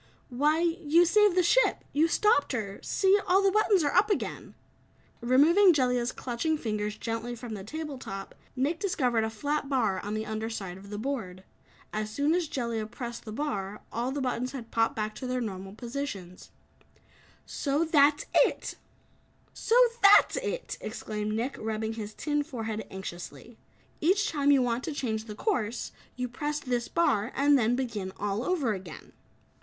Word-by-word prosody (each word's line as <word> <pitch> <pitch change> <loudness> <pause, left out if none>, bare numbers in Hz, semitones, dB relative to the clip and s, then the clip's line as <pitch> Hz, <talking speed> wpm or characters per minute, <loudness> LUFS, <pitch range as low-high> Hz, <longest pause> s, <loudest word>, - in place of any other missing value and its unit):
"Why, 295 +6 +2
you 340 -1 +3
saved 415 +1 +4
the 365 - +5
ship. - - +3
You 310 +3 +4
stopped 330 -6 +2
her. 200 -5 -4
See, 390 +1 +3
all 380 +2 +4
the 390 - +4
buttons 415 -3 +3
are 290 - 0
up 425 - +4
again!" 405 - -3 0.7
Removing 320 +11 +6
Jellia's 250 -3 +1
clutching 265 +6 -2
fingers 210 -4 -3
gently 230 +1 -4
from 235 -1 -7
the 200 -2 -6
table 300 +4 -6
top, 195 -4 -7 0.2
Nick 285 +6 0
discovered 250 - +1
a 220 - -1
flat 285 +6 -2
bar 220 -9 +1
on 205 +2 -4
the 215 0 -3
under 220 +1 -3
side 195 -6 -5
of 200 +1 -13
the 205 - -5
board. 215 -7 -4 0.5
As 215 0 -2
soon 285 +8 +1
as 350 -2 0
Jellia 235 -5 -3
pressed 240 0 -7
the 215 - -6
bar, 210 -6 -4
all 240 +3 -1
the 285 +1 -3
buttons 255 0 -2
had 240 -4 -8
popped 225 0 +1
back 215 0 -2
to 255 - -6
their 250 0 -1
normal 195 -4 -5
position. 235 -7 -5 1.1
"So 290 +3 -1
THAT'S 295 -2 +4 1.3
it!" 475 0 +4
exclaimed 215 0 -4
Nick, 245 +5 -2
rubbing 220 0 -2
his 215 -1 -7
tin 295 -1 0
forehead 225 -7 -5
anxiously. 190 +4 -8 0.4
"Each 390 +6 +2
time 285 -3 +1
you 275 -3 +5
want 240 +1 -1
to 315 - -3
change 220 -5 -2
the 210 -2 -8
course, 235 - -2 0.2
you 250 0 -2
press 295 +5 -3
this 245 -4 -2
bar 240 -10 +1
and 285 +1 +4
then 240 -2 +3
begin 220 -7 -3
all 205 +2 -1
over 285 -9 0
again." 185 -3 -9
250 Hz, 165 wpm, -28 LUFS, 220-300 Hz, 1.3 s, Removing